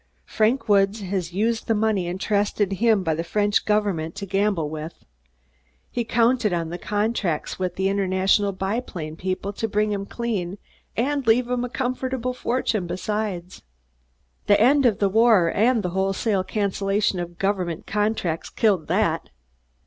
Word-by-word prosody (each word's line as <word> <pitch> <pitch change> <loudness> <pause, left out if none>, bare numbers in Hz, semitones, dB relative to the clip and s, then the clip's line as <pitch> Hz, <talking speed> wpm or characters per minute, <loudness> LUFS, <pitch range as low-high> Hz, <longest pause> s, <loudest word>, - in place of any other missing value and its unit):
Frank 225 +2 +1
Woods 200 +1 +3
has 185 -3 -3
used 225 +5 -1
the 225 - +2
money 210 -4 +1
entrusted 200 +2 0
him 215 -1 +2
by 165 -2 +1
the 165 +2 -2
French 205 +4 +1
Government 200 -6 0
to 200 0 -5
gamble 195 -4 0
with. 155 +2 -7 0.9
He 240 - -1
counted 235 -1 +2
on 170 -2 -1
the 175 +2 -5
contracts 205 -7 -1
with 185 -1 -2
the 190 0 0
International 195 +1 +2
Biplane 190 -5 -4
people 185 +3 -3
to 225 - -2
bring 210 0 0
him 200 -1 -3
clean 205 -6 -3 0.4
and 275 +2 0
leave 240 +2 +4
him 250 0 -1
a 245 - -3
comfortable 255 0 -2
fortune 235 -6 -1
besides. 185 0 -3 0.9
The 205 - +5
end 265 +4 +5
of 215 -5 +1
the 200 - +2
war 215 -4 +4
and 230 +1 +2
the 180 - -1
wholesale 195 +1 0
cancellation 200 -1 0
of 175 -1 -6
government 185 -4 -1
contracts 205 -6 -1
killed 195 -8 +1
that. 170 -3 0
200 Hz, 150 wpm, -23 LUFS, 185-225 Hz, 0.9 s, The